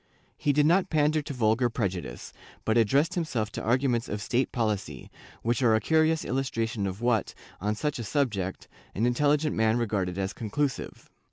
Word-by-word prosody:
He 145 Hz, -, +1 dB
did 145 Hz, +1 st, +3 dB
not 175 Hz, +4 st, +3 dB
pander 155 Hz, 0 st, +2 dB
to 145 Hz, -, -7 dB
vulgar 120 Hz, -1 st, +2 dB
prejudice, 95 Hz, -, -4 dB, 0.3 s
but 110 Hz, -, +2 dB
addressed 135 Hz, +7 st, +3 dB
himself 125 Hz, -, -2 dB
to -, -, -5 dB
arguments 120 Hz, 0 st, +1 dB
of 105 Hz, -, -3 dB
state 125 Hz, +5 st, 0 dB
policy, 105 Hz, -, -2 dB, 0.3 s
which 120 Hz, +1 st, 0 dB
are 115 Hz, -3 st, +4 dB
a -, -, +3 dB
curious 160 Hz, +3 st, +2 dB
illustration 115 Hz, -5 st, -1 dB
of 95 Hz, +3 st, -6 dB
what, 120 Hz, -3 st, +1 dB, 0.2 s
on 105 Hz, +3 st, -1 dB
such 150 Hz, +3 st, -2 dB
a -, -, -3 dB
subject, 105 Hz, -7 st, -1 dB, 0.3 s
an 110 Hz, -, +1 dB
intelligent 145 Hz, +5 st, +2 dB
man 110 Hz, +1 st, +2 dB
regarded 100 Hz, -6 st, -1 dB
as 95 Hz, +1 st, -2 dB
conclusive. 135 Hz, +5 st, -3 dB
120 Hz, 170 wpm, -27 LUFS, 105-145 Hz, 0.3 s, are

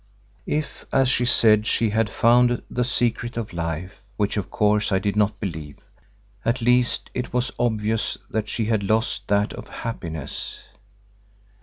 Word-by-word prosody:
If, 150 Hz, 0 st, -2 dB
as 135 Hz, -1 st, +3 dB
she 125 Hz, -, +2 dB
said, 110 Hz, -3 st, +4 dB
she 115 Hz, -2 st, +1 dB
had 110 Hz, 0 st, +1 dB
found 120 Hz, +2 st, +3 dB
the 125 Hz, -, 0 dB
secret 120 Hz, -1 st, 0 dB
of 110 Hz, -5 st, -4 dB
life, 85 Hz, +3 st, -4 dB, 0.2 s
which 105 Hz, -1 st, 0 dB
of 100 Hz, -3 st, -2 dB
course 105 Hz, 0 st, +2 dB
I 95 Hz, -, +4 dB
did 100 Hz, +2 st, -1 dB
not 105 Hz, -1 st, +1 dB
believe, 80 Hz, -7 st, -5 dB, 0.7 s
at 115 Hz, +2 st, +1 dB
least 125 Hz, +1 st, +2 dB
it 125 Hz, 0 st, -4 dB
was 125 Hz, 0 st, 0 dB
obvious 110 Hz, -1 st, 0 dB
that 110 Hz, -1 st, -2 dB
she 115 Hz, -, -1 dB
had 110 Hz, -1 st, +1 dB
lost 110 Hz, +3 st, 0 dB
that 100 Hz, +1 st, +1 dB
of -, -, -9 dB
happiness. 80 Hz, -, -5 dB
110 Hz, 155 wpm, -23 LUFS, 100-120 Hz, 0.7 s, said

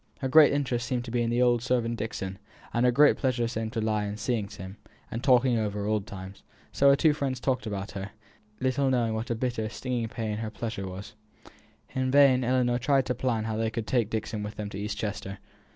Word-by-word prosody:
Her 135 Hz, -, -2 dB
great 150 Hz, +2 st, +7 dB
interest 130 Hz, -4 st, -1 dB
seemed 125 Hz, -3 st, -2 dB
to 115 Hz, -, -7 dB
be 120 Hz, 0 st, +1 dB
in 115 Hz, -, 0 dB
the 120 Hz, +1 st, +2 dB
old 120 Hz, -1 st, +3 dB
servant 120 Hz, -2 st, 0 dB
Dixon, 95 Hz, -3 st, -4 dB, 0.3 s
and 120 Hz, +1 st, +3 dB
her -, -, +5 dB
great 145 Hz, +4 st, +5 dB
pleasure 125 Hz, -3 st, 0 dB
to 115 Hz, 0 st, -3 dB
lie 110 Hz, -1 st, 0 dB
in 105 Hz, +1 st, -4 dB
seeing 110 Hz, -1 st, -1 dB
him, 95 Hz, -1 st, -9 dB, 0.3 s
and 115 Hz, +2 st, -4 dB
talking 125 Hz, -3 st, +4 dB
over 105 Hz, -1 st, -2 dB
old 105 Hz, -1 st, -1 dB
times; 95 Hz, 0 st, -9 dB, 0.3 s
so 140 Hz, -, +4 dB
her 140 Hz, -, +7 dB
two 155 Hz, +1 st, +3 dB
friends 135 Hz, -4 st, -2 dB
talked 125 Hz, -2 st, -1 dB
about 100 Hz, 0 st, -4 dB
her, 100 Hz, 0 st, -6 dB, 0.5 s
little 130 Hz, +1 st, +1 dB
knowing 120 Hz, -3 st, +1 dB
what 110 Hz, +2 st, -3 dB
a 120 Hz, -, 0 dB
bitter, 115 Hz, -2 st, -2 dB
stinging 120 Hz, 0 st, -3 dB
pain 110 Hz, -2 st, -3 dB
her 110 Hz, 0 st, -3 dB
"pleasure" 110 Hz, -3 st, -5 dB
was. 95 Hz, +2 st, -8 dB, 0.8 s
In 130 Hz, -1 st, 0 dB
vain 135 Hz, -2 st, +5 dB
Ellinor 125 Hz, -1 st, +2 dB
tried 135 Hz, +1 st, +2 dB
to 125 Hz, -, 0 dB
plan 120 Hz, -3 st, -1 dB
how 110 Hz, 0 st, -2 dB
they 110 Hz, 0 st, 0 dB
could 110 Hz, 0 st, -4 dB
take 115 Hz, -2 st, +1 dB
Dixon 110 Hz, -1 st, -3 dB
with 105 Hz, +1 st, -6 dB
them 105 Hz, -1 st, -5 dB
to 100 Hz, -, -6 dB
East 105 Hz, 0 st, -3 dB
Chester. 100 Hz, -2 st, -4 dB
115 Hz, 220 wpm, -28 LUFS, 105-125 Hz, 0.8 s, great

